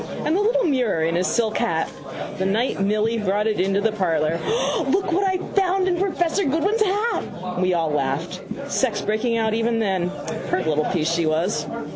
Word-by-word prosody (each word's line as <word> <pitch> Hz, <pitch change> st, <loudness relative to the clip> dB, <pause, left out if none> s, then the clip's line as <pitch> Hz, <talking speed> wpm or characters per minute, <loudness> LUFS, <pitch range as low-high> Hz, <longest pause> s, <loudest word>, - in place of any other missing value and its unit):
And 310 Hz, -, +2 dB
the 395 Hz, -, +2 dB
little 485 Hz, +4 st, +2 dB
mirror 250 Hz, -, +1 dB
in 165 Hz, +1 st, +1 dB
his 180 Hz, +2 st, +1 dB
silk 220 Hz, -2 st, +1 dB
hat. 160 Hz, -1 st, 0 dB, 0.5 s
The 190 Hz, -, 0 dB
night 215 Hz, +2 st, 0 dB
Milly 215 Hz, +3 st, +1 dB
brought 205 Hz, +1 st, 0 dB
it 215 Hz, -, 0 dB
into 195 Hz, +2 st, +2 dB
the 225 Hz, +1 st, +2 dB
parlour. 165 Hz, -5 st, 0 dB
O, 440 Hz, -7 st, 0 dB
look 380 Hz, +4 st, +1 dB
what 375 Hz, +4 st, +2 dB
I 380 Hz, -1 st, +1 dB, 0.2 s
found 380 Hz, -1 st, +2 dB
in 355 Hz, -2 st, +1 dB
professor 365 Hz, 0 st, 0 dB
Goodwin's 350 Hz, +10 st, +1 dB
hat! 425 Hz, +3 st, +1 dB, 0.2 s
All 180 Hz, 0 st, -4 dB
we 185 Hz, -1 st, +2 dB
laughed. 155 Hz, +2 st, -1 dB, 0.3 s
Sex 260 Hz, -4 st, 0 dB
breaking 225 Hz, +2 st, 0 dB
out 220 Hz, -1 st, +1 dB
even 230 Hz, +1 st, +1 dB
then. 190 Hz, -5 st, 0 dB, 0.4 s
Pert 185 Hz, -, 0 dB
little 155 Hz, -1 st, +1 dB
piece 165 Hz, -3 st, 0 dB
she 170 Hz, -1 st, +1 dB
was. 165 Hz, +6 st, 0 dB
215 Hz, 190 wpm, -22 LUFS, -, 0.5 s, And